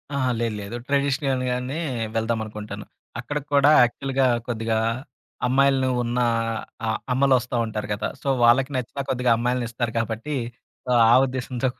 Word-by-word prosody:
అహా! 130 -2 +1
లేదు. 115 -2 -1
లేదు. 100 +3 -6
ట్రెడిషనల్‌గానే 135 -2 0 0.4
వెళ్దాం 115 0 0
అనుకుంటాను. 105 -1 -7 0.3
అక్కడికి 145 -1 -4
కూడా 140 +1 +6
యాక్చువల్‌గా 135 +2 +1 0.2
కొద్దిగా 115 -1 -1 0.7
అమ్మాయిల్ని 135 0 +3
ఉన్న 120 +1 -2 0.7
అ - - -1 0.3
అమ్మలొస్తా 130 -2 +2
ఉంటారు 105 -1 -4
గదా! 105 +1 -2
సో, - - -7 0.2
వాళ్ళకి 130 +4 +4
నచ్చిన 130 +3 -4
కొద్దిగా 125 -1 +1
అమ్మాయిల్నిస్తారు 120 -1 -2
కాబట్టి, 115 +7 -3 0.8
ఆ - - +7
ఉద్దేశంతో 130 0 -2
కూడా - - -36
125 Hz, 125 wpm, -24 LUFS, 115-135 Hz, 0.8 s, ఆ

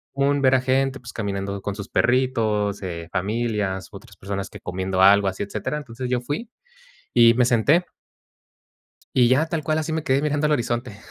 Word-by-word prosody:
Un 140 0 +1
ver 130 0 +4
a 130 - +2
gente, 135 +1 0
pues 120 -2 -11
caminando 100 -2 -3
con 100 0 -4
sus 100 -2 -8
perritos, 115 -5 +1
eh, 85 -2 -5
familias, 105 -1 -2
otras 100 -2 -13
personas 100 0 -5
que - - -11
comiendo 95 +1 -3
algo 100 +1 +6
así, 95 +1 -2
etcétera. 100 +8 -4
Entonces, 125 -2 -6
yo 125 -1 0
fui 150 - -4 0.7
y 115 -1 +7
me 125 0 +3
senté. 140 +9 +3 1.3
Y 125 -2 +5
ya, 140 +6 +3
tal 160 -2 -3
cual, 155 0 0
así 160 0 -2
me 160 -1 -2
quedé 135 +2 +2
mirando 150 0 +1
al 150 - +1
horizonte. 120 -4 -2
120 Hz, 185 wpm, -23 LUFS, 100-135 Hz, 1.3 s, y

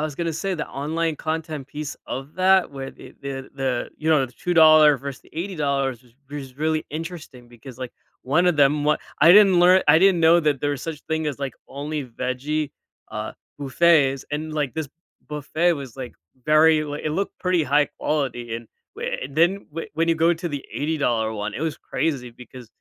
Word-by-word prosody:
was 155 -2 -3
gonna 170 -1 -1
say 190 +4 -2
the 150 - -3
online 160 +3 -2
content 155 -3 -4
piece 150 -1 -5
of 135 +4 -6
that 185 -3 +3
where 135 0 -6
the - - -14
the 135 -1 -6
the 130 -3 -2
you 160 +1 -1
know, 140 -4 +4
the 120 - -17
$2 155 -4 +5
versus 140 -1 -6
the - - -22
$80 140 - -2
was 125 - -23 0.2
was 135 -3 -8
really 155 0 0
interesting 155 -6 -7
because, 120 +1 -13
like, 125 -2 -6 0.3
one 160 +7 +2
of 155 - -3
them 145 +1 +4
w 150 +1 +3 0.3
I 165 - +9
didn't 195 -2 +7
lear 180 +1 +7
I 155 +2 +7
didn't 195 -3 +5
know 165 +1 +6
that 150 -3 +1
there 145 - 0
was 130 - -8
such 160 -2 -6
thing 160 -1 -1
as, 140 - -5
like, 135 -2 -4
only 145 +1 -4
veggie, 130 +5 -3 0.4
uh, - - -4 0.3
buffets 140 -2 +3
and, 155 +1 -3
like, 145 -5 -2
this 160 -3 -3 0.4
buffet 155 +4 0
was, 135 -4 -8
like, 130 -2 -7 0.3
very 155 0 +5
like, 145 -1 -5
it 155 - 0
looked 195 +3 -3
pretty 180 -2 +1
high-quality 140 -4 -1
and 115 - -15 0.3
w - - -4 0.2
and 135 +3 -8
then 175 +3 +5 0.2
w 165 +2 -5
when 165 +1 0
you 165 - +2
go 170 +1 +4
to 170 +1 -5
the 145 -2 -5
$80 130 -7 0
one, 105 0 -4
it - - -5
was 160 -2 -2
crazy 130 -6 -2
because, 125 0 -12
150 Hz, 195 wpm, -23 LUFS, 135-160 Hz, 0.4 s, I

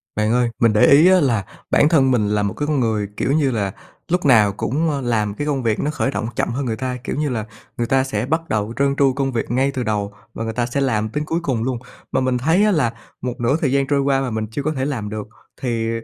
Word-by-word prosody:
Bạn 105 +1 +1
ơi, 120 -1 +2
mình 115 -2 +4
để 105 - +5
ý 150 +5 +7
á 185 0 +6
là 115 - +1 0.3
bản 145 - +5
thân 135 -5 +4
mình 110 -5 +2
là 105 0 +1
một 100 -2 -1
cái 145 - -3
người, 115 -8 0
kiểu - - 0
như 145 -2 +2
là, 100 -5 -1 0.4
lúc 175 0 0
nào 110 -7 +5
cũng, 155 +7 0
ơ, 140 -2 -2
làm 110 -4 0
cái 145 +7 -4
công 135 -3 -1
việc 110 -2 0
nó 150 - 0
khởi 130 -8 -1
động 110 +2 -3
chậm - - 0
hơn 135 +3 -2
người 115 -3 -1
ta. 125 +1 -3
Kiểu - - -3
như 150 0 -1
là, 115 -4 -2 0.3
người 120 -1 -1
ta 135 +1 +3
sẽ 110 -4 -2
bắt 160 +4 -1
đầu 105 +1 -1
trơn 140 0 +2
tru 135 -1 +3
công 135 0 -1
việc 115 -2 -3
ngay 135 +3 +2
từ 130 -2 -3
đầu 105 -2 -2 0.2
và 115 - -4
người 110 0 -3
ta 120 +2 0
sẽ 135 +4 -2
làm 110 -5 0
tới 150 +6 -2
cuối 165 +2 -1
cùng 125 -7 -1
luôn, 125 -1 -2 0.3
mà - - +1
mình 130 -1 +1
thấy 160 +10 +2
á 210 - +3
là 140 - +1 0.3
một 125 0 -2
nửa 120 +5 +2
thời 140 - +1
gian 135 0 +1
trôi 140 -1 +2
qua 135 -1 +2
mà 135 - -2
mình 110 0 -2
chưa 140 +5 -3
có 155 - 0
thể 130 -2 -2
làm 120 -8 -3
được. 105 0 -5 0.3
Thì 115 -3 -1
130 Hz, 280 wpm, -20 LUFS, 110-140 Hz, 0.4 s, ý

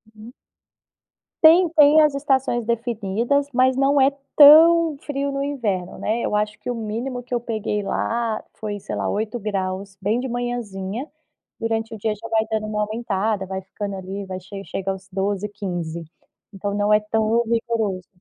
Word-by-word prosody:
Uhum. 220 +4 -12 1.1
Tem, 340 +3 +7
tem 300 +1 +7
as 300 -2 +3
estações 265 -4 0
definidas, 235 +4 -1
mas 255 +1 +3
não 275 +1 +3
é 270 +1 +5 0.3
tão 320 +2 +8
frio 280 -1 -3
no 275 0 -2
inverno, 215 -11 -3
né. 225 +3 -1
Eu 210 - 0
acho 210 0 -2
que 245 - -5
o - - -2
mínimo 235 +3 -4
que 250 +1 -9
eu - - +1
peguei 215 -3 -2
lá 230 +1 -1
foi 205 -2 -5
sei - - -6
lá - - -2
8ºC 200 -3 -3
bem 220 +5 0
de 260 - -4
manhãzinha, 240 -2 -4 0.5
durante 225 0 -2
o - - -6
dia 210 +1 -1
já 230 +2 -10
vai 220 0 +2
dando 215 -1 -2
uma 210 0 -1
aumentada, 215 -2 -2
vai 190 0 -5
ficando 200 +1 -6
ali 195 +1 -6
vai 185 -1 -6
che 195 +2 -9
chega 195 0 -3
aos 190 0 -8
12, 200 +1 -2
15, 175 -5 -5 0.5
então 200 +1 -4
não 205 +1 +2
é 210 - +4
tão 220 +2 +1
rigoroso. 225 -5 -1
220 Hz, 170 wpm, -22 LUFS, 200-245 Hz, 1.1 s, tão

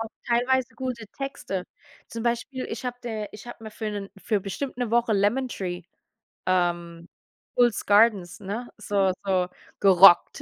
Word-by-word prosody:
auch 225 - -7 0.2
teilweise 250 +2 +1
gute 250 -4 -5
Texte. 195 -9 -4 0.4
Zum 230 -1 -6
Beispiel, 240 +2 -2
ich 225 +3 -6
habe 245 0 -3
der 220 -3 -5
ich 210 +3 -11
habe 240 -1 -10
mir 220 - -7
für 215 0 -4
'nen 200 -1 -5
für 210 0 0
bestimmt 240 +8 -5
'ne 245 -3 -2
Woche 235 -1 +2
„Lemon 210 +6 +2
Tree“, 180 -5 -5 0.6
ähm, 175 -2 -1 0.5
The 245 - +3
Fools 240 -2 +1
Gardens, 205 -2 +3
ne, 210 +5 -5
so 200 -3 +1
so 185 -2 +1 0.3
gerockt. 190 -2 +7
215 Hz, 160 wpm, -25 LUFS, 195-240 Hz, 0.6 s, gerockt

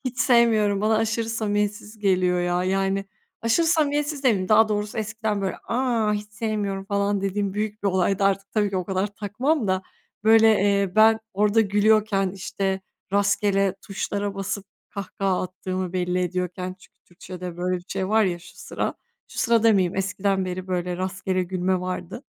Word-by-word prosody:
Hiç 250 -1 -4
sevmiyorum. 220 -5 +4
Bana 215 +1 +2
aşırı 225 +1 0
samimiyetsiz 210 -1 -2
geliyor 185 -3 +2
ya. 175 +1 0
Yani, 195 +1 0 0.4
aşırı 230 +9 +2
samimiyetsiz 295 -2 +1
demeyeyim. 195 -7 +2
Daha 220 0 +6
doğrusu 210 +1 -2
eskiden 220 -1 -2
böyle, 195 -1 -2
"A! 235 -4 +1
Hiç 210 0 -4
sevmiyorum." 210 -3 -2
falan 200 0 0
dediğim 195 0 -1
büyük 210 0 -3
bir 200 - +2
olaydı. 190 +1 +1
Artık 195 0 +1
tabii 210 -2 +1
ki 195 - -2
o 185 - -1
kadar 190 +1 -1
takmam 215 +6 -1
da, 185 0 +1 0.4
böyle, 225 0 +7
eee, 200 -2 +2
ben 220 +1 +6
orada 210 +3 +3
gülüyorken, 210 -1 +2
işte, 190 0 -3 0.3
rastgele 200 -1 +2
tuşlara 200 0 -3
basıp 195 0 -4 0.3
kahkaha 195 -1 -2
attığımı 185 0 -4
belli 180 0 0
ediyorken 180 0 -2
çünkü - - -22
Türkçe'de 180 0 -9
böyle 180 +1 -1
bir 175 - -10
şey 190 -1 -2
var 220 +1 +4
ya 175 -3 -1
şu 170 - -16
sıra. - - -3 0.3
Şu - - -10
sırada 230 -1 +3
demeyeyim. 195 -5 +3
Eskiden 195 0 0
beri 185 0 -5
böyle 180 -1 -2
rastgele 185 0 -2
gülme 185 0 -1
vardı. 185 +5 -5
200 Hz, 165 wpm, -24 LUFS, 185-215 Hz, 0.4 s, böyle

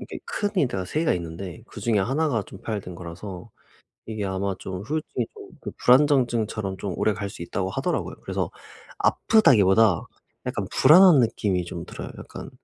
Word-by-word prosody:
이게 - - -7
큰 205 - -2
인대가 110 - +1
3 150 +12 -2
개가 165 - +2
있는데 85 +4 -6
그중에 110 0 -1
1 135 +11 +1
가 115 -6 0
좀 95 - -13
파열된 105 -6 -5
거라서 90 +4 -8 0.6
이게 110 -2 -4
아마 95 0 -2
좀 95 0 -6
후유증이 145 -1 -3 0.4
좀 - - -6
불안정증처럼 120 -7 +3
좀 100 -3 -4
오래 110 - +2
갈 100 0 -4
수 95 - -10
있다고 95 +2 -3
하더라고요. - - -2
그래서 - - -2 0.5
아프다기보다 110 - +4 0.4
약간 - - -2
불안한 170 +2 +7
느낌이 105 -6 +1
좀 85 -1 -6
들어요. - - -8
약간 - - -9
105 Hz, 350 characters per minute, -25 LUFS, 95-125 Hz, 0.6 s, 불안한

